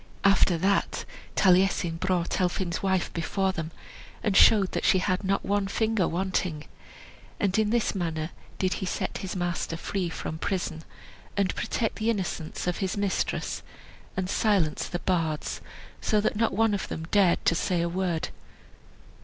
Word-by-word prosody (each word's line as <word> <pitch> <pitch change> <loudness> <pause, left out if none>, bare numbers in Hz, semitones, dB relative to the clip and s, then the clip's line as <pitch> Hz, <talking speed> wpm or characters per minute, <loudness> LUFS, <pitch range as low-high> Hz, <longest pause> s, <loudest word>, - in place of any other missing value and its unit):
After 195 -3 +4
that 195 +4 +1 0.3
Taliesin 185 -3 +3
brought 180 0 0
Elphin's 180 -1 0
wife 190 -2 0
before 190 +3 0
them, 165 -4 -4 0.5
and 205 -3 +1
showed 200 -3 +6
that - - -2
she - - +5
had 185 +1 0
not 195 +1 0
one 200 0 +1
finger 220 -2 +1
wanting. 180 -3 -1 0.8
And 200 -2 +1
in 215 -1 +2
this 235 0 +1
manner 165 -4 -2 0.3
did 185 -1 +1
he 190 - -2
set - - -2
his 190 -1 -5
master 175 -2 -2
free 180 +1 -2
from 160 -1 -5
prison, 170 -4 -2 0.5
and 195 -2 +2
protect 225 - -2
the 220 +1 0
innocence 185 -7 -2
of 180 -1 0
his 190 0 -2
mistress, 200 -2 -1 0.6
and 190 -1 0
silence 195 -6 +1
the 175 - -3
bards 165 -4 -1 0.4
so 215 - +2
that 210 - 0
not 225 +2 +2
one 225 +2 +2
of 200 - -2
them 160 - -5
dared 195 -4 +4
to - - +5
say 175 +1 0
a - - +1
word. 175 -2 -1
185 Hz, 160 wpm, -27 LUFS, 170-200 Hz, 0.8 s, showed